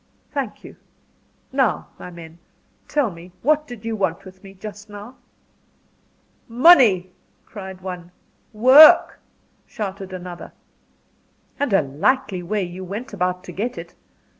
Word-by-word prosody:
"Thank - - -4
you. - - -13 0.7
Now, 265 -4 0
my - - -9
men, 170 -1 -12 0.5
tell 285 -8 0
me 175 +1 -13
what 305 +2 +2
did 235 -3 -10
you 225 -1 -2
want 190 -5 -2
with 190 +1 -14
me 195 0 -13
just 210 +2 -10
now?" 205 +5 -11 1.3
"Money," 230 - +5 0.3
cried 190 -3 -10
one. 180 -2 -8 0.4
"Work," 260 +8 +7 0.5
shouted 195 -2 -6
another. 180 -1 -9 1.1
"And 285 -4 -1
a 195 -5 +3
likely 185 - -1
way 200 +3 -2
you 180 +1 -7
went 205 +6 -7
about 180 -1 -2
to 180 - -9
get 230 +8 -4
it! - - -9
195 Hz, 130 wpm, -21 LUFS, 180-235 Hz, 1.3 s, Work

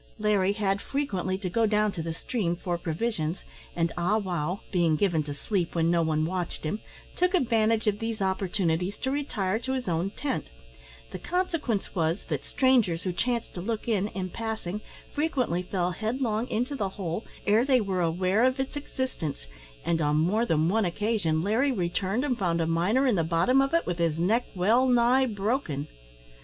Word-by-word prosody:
Larry 205 -3 +2
had 200 -2 0
frequently 190 -10 -2
to 190 -1 -4
go 225 +5 +2
down 210 0 +2
the 165 -1 -3
stream 175 -4 -1
for 175 0 -2
provisions, 165 -1 -2 0.3
and 165 -1 +1
Ah 180 +5 +2
wow 180 -2 -2
being 170 -5 +3
given 170 -1 +2
to 145 -1 -5
sleep 175 +2 -2
when 165 0 +2
no 170 -1 +3
one 155 -1 +1
watched 180 0 -3
him, 160 +7 -2 0.4
took 360 +1 +2
advantage 225 -6 +2
of 210 -1 +1
those 225 -1 -3
opportunities 190 -1 0
to 265 - -2
retire 220 -8 -1
to 260 +2 -3
his 260 -4 -3
own 170 +2 0
tent; 270 +6 -3 0.7
the - - -6
consequence 330 - -1
was, 165 0 0
that - - -2
strangers 235 -11 +2
who 185 - -1
chanced 235 +5 -1
to 175 - -5
look 220 +4 -3
in, 205 -3 +1
in 185 -3 -5
passing, 220 -3 -4 0.3
frequently 265 - 0
fell 180 -1 -1
headlong 225 +3 -1
into 250 +3 -1
the 205 -7 -1
hole 190 +1 -4 0.2
ere 215 +3 +4
they 260 -1 +4
were 195 -4 -1
aware 185 +6 +2
of 255 +1 +2
its 265 +2 -2
existence, 260 - -4 0.4
and 165 -1 +1
on 150 0 +2
more 195 +10 +2
than 160 0 +2
one 220 +5 +2
occasion 175 -4 0
Larry 230 +8 +2
returned 195 +4 -1
and 255 -4 -1
found 170 -3 +1
a 165 - +1
miner 180 +11 +2
in 255 - +3
the 170 -5 +2
bottom 170 +12 +3
of 275 - +1
it 335 - +2
with 175 -1 -2
his 165 -2 +1
neck 215 +9 +2
well 225 +8 +3
nigh 250 +2 +4
broken. 205 - -1
200 Hz, 185 wpm, -27 LUFS, 170-235 Hz, 0.7 s, ere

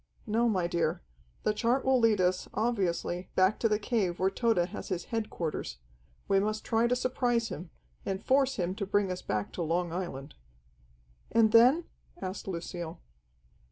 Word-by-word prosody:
"No, 230 +3 +2
my 185 -5 +1
dear. 170 - -1 0.4
The 210 - +2
chart 240 +5 +1
will 265 -1 +4
lead 225 -3 +4
us, 180 0 +1
obviously, 190 -5 -1
back 190 +3 +3
to 225 - +2
the 210 - +2
cave 205 -5 0
where 190 +1 +2
Tode 230 +1 +1
has 175 +1 -2
his 180 -3 -3
headquarters. 195 - -3 0.5
We 195 - +4
must 215 +2 -2
try 230 0 +2
to 250 - +2
surprise 245 -2 0
him, 170 +3 -7 0.3
and 190 +2 -3
force 270 0 +3
him 180 -1 -1
to 200 -3 -3
bring 200 -1 +1
us 180 - -4
back 105 0 -2
to - - -4
Long 170 +1 0
Island." 155 -6 -5 1.0
"And 225 -1 +4
then?" 250 +9 +6 0.4
asked 190 +2 -5
Lucille. 170 -2 -5
200 Hz, 165 wpm, -30 LUFS, 175-230 Hz, 1.0 s, then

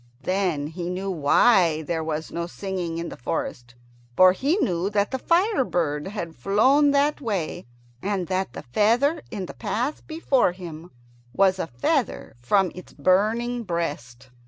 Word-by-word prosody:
Then 185 -6 0
he 170 +3 -5
knew 190 +2 -3
why 165 0 +4
there 165 0 -2
was 160 0 -4
no 170 0 -3
singing 180 -3 -4
in 170 0 -4
the - - -8
forest. 120 0 -4 0.4
For 185 0 +8
he 280 - 0
knew 180 - 0
that 205 0 0
the 265 - -2
fire 360 - +2
bird 150 -8 -1
had 175 -5 -5
flown 255 - +3
that 285 +1 +2
way, 195 - -3 0.3
and 195 -2 -1
that 185 -6 -2
the - - -8
feather 235 - +2
in 200 -5 -4
the - - -9
path 250 +7 -3
before 280 - +1
him 170 -2 -9 0.4
was 190 -1 +3
a - - -2
feather 195 - -1
from 190 +9 +2
its 180 - -12
burning 220 +9 +1
breast. 145 - -4
185 Hz, 160 wpm, -24 LUFS, 165-230 Hz, 0.4 s, For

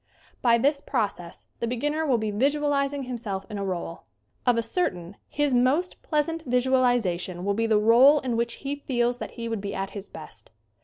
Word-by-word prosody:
By 235 -2 +4
this 280 +4 +1
process 180 -5 -3
the 235 - -1
beginner 295 +6 -1
will 255 -4 +3
be 215 -1 -2
visual 290 +7 +1
izing 280 -1 0
himself 220 -6 -4
in 205 - -4
a - - -2
role. 175 -3 -4 0.4
Of 245 -1 +4
a 230 - +1
certain 185 - -2
his 290 -2 0
most 265 +9 +1
pleasant 325 +1 -1
visualization 245 -8 +1
will 200 - +1
be 225 +2 0
the 220 -1 +3
role 240 +7 +6
in 250 -3 -2
which 235 0 -1
he 280 +1 -1
feels 245 -3 -1
that - - -6
he 230 0 -4
would 225 -3 -3
be 200 0 -4
at 195 0 -3
his 200 -1 -8
best. - - -11
240 Hz, 195 wpm, -26 LUFS, 205-280 Hz, 0.4 s, role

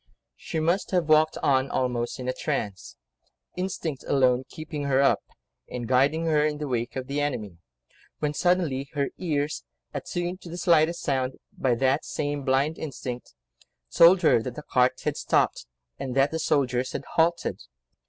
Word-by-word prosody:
She 160 - -4
must 170 +5 +1
have 175 -4 0
walked 155 0 +4
on 135 -1 +3
almost 125 -2 -1
in 125 - -5
a 130 - 0
trance, 100 -6 -4 0.6
instinct 180 -6 -3
alone 130 -2 +3
keeping 155 -2 -6
her 135 -1 +2
up, 140 - +4 0.5
and 120 -2 -5
guiding 140 +6 +3
her 155 -2 +3
in 150 -1 0
the 150 0 -4
wake 120 -2 -2
of 130 -1 -3
the 140 +2 -2
enemy, 110 -12 -3 0.6
when 150 -1 -1
suddenly 155 -6 +1
her 140 -2 0
ears, 150 -4 -1 0.3
attuned 175 +2 -4
to 175 - -10
the 170 - -6
slightest 170 -1 +3
sound, 130 -2 -1 0.2
by 125 -3 +1
that 135 +4 +1
same 145 -1 -3
blind 135 +4 +1
instinct, 125 - -6 0.6
told 175 +2 +6
her 135 -7 +5
that 120 +1 -6
the 150 - -7
cart 125 -2 +2
had - - -1
stopped, - - +1 0.3
and 130 -2 -4
that 135 +1 +3
the 160 - -2
soldiers 130 -4 +1
had - - -4
halted. 170 +1 +1
140 Hz, 165 wpm, -26 LUFS, 130-160 Hz, 0.6 s, told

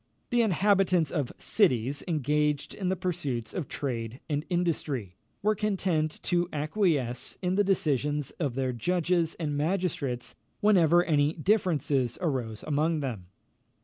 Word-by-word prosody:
The 240 -1 +4
inhabitants 195 -5 +3
of 145 -7 -1
cities, 140 - +1
engaged 150 -2 0
in 190 -3 -2
the 190 - +1
pursuits 160 - -3
of 175 -7 -3
trade 120 -3 -4
and 150 -1 -1
industry, 150 - -1 0.3
were 215 +1 +4
content 190 -7 -1
to 175 -1 +1
acquiesce 150 - 0
in 180 0 +1
the 205 +2 +3
decisions 150 -6 0
of 140 -7 -1
their 130 -1 -1
judges 170 +5 0
and 150 -3 -3
magistrates 145 -6 -1 0.3
whenever 175 -5 +5
any 150 -3 +2
differences 155 - +1
arose 125 - -2
among 155 +1 +1
them. 115 -10 -4
155 Hz, 130 wpm, -28 LUFS, 135-180 Hz, 0.3 s, whenever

